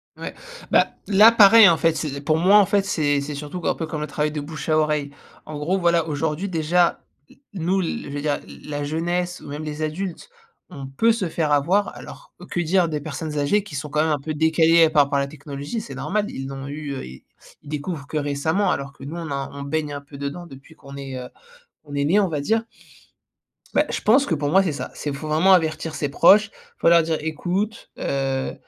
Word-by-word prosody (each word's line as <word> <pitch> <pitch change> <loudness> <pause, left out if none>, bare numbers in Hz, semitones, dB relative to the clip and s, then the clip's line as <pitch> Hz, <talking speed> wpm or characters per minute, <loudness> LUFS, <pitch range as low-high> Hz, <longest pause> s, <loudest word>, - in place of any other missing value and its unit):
Ouais, - - -7 0.4
bah, - - +5 0.2
là 210 +3 +7
pareil 220 -2 +8
en 165 - +3
fait 165 0 +2
c'est 140 -3 -4
pour 155 +2 +1
moi 190 +5 +5
en 205 - +6
fait 200 +1 +1
c'est 145 -6 +1
c'est 145 +1 -5
surtout 150 +5 -6
que, - - -3
un - - +1
peu 165 - -4
comme 155 -1 -5
le 150 - -3
travail 150 +1 -1
de 150 -1 -4
bouche 150 +1 -7
à 155 - +3
oreille. 150 -2 0 0.3
En 155 -1 -7
gros, 175 +6 0
voilà 170 -2 +2
aujourd'hui, 155 +5 -2
déjà 170 +1 +1 0.3
n - - -20 0.2
nous, 185 +1 0
l 145 -4 -4
l 145 -1 0 0.3
la 145 -1 -3
jeunesse 175 +4 -2
ou - - -12
même 145 +2 -5
les 150 0 -5
adultes 175 - -4 0.4
on 140 -7 -8
peut 225 +13 +2
se 200 -6 -2
faire 155 -2 -1
avoir, 180 +9 +1
alors - - -12 0.2
que - - -1
dire 175 +1 +2
des 150 -1 -2
personnes 150 +1 -5
âgées 145 +9 +2
qui 180 -8 -10
sont 145 +1 -4
quand 150 +1 +1
même 160 - +1
un 150 - 0
peu 155 +3 -4
décalées, 160 +2 +4
heu, - - +2
par 150 -2 +5
rapport 140 0 -3
à - - +2
la 140 - -2
technologie? 145 - -6
C'est 235 - -9
normal 210 +1 -1
ils 135 0 -6
n'ont 135 0 -7
eu, 145 0 -5
heu, - - -6
ils 65 +1 -12 0.4
ils 150 - -14
découvrent 150 0 -5
que 155 - -3
récemment 150 +7 0
alors 140 0 -4
que - - -14
nous 145 +4 -6
on 165 -2 -5
a, 140 -1 -3
on 140 - -7
baigne 145 +1 -2
un 145 - -5
peu 140 0 -13
dedans 140 +5 -5
depuis 135 +2 -14
qu'on 140 -2 -12
est, 135 -1 -7
heu, 125 - -8 0.5
qu'on 145 -2 -9
est 140 0 0
né 180 +8 +3
on 200 - +2
va 155 -4 -3
dire. 225 +10 +1 1.1
Bah - - +3
je - - -3
pense 260 +6 +4
que 165 - 0
pour 145 0 -2
moi 190 +4 +5
c'est 170 -6 -1
ça, - - -6
c'est, 145 - -4
faut 140 +3 -6
vraiment 165 +5 +4
avertir 160 -2 0
ses 145 - -2
proches. 200 +8 +5 0.3
Faut - - +3
leur 170 -1 +6
dire: 160 0 -1
«Ecoute, 185 +8 -3
heu, 135 -1 -2
155 Hz, 235 wpm, -22 LUFS, 145-175 Hz, 1.1 s, pareil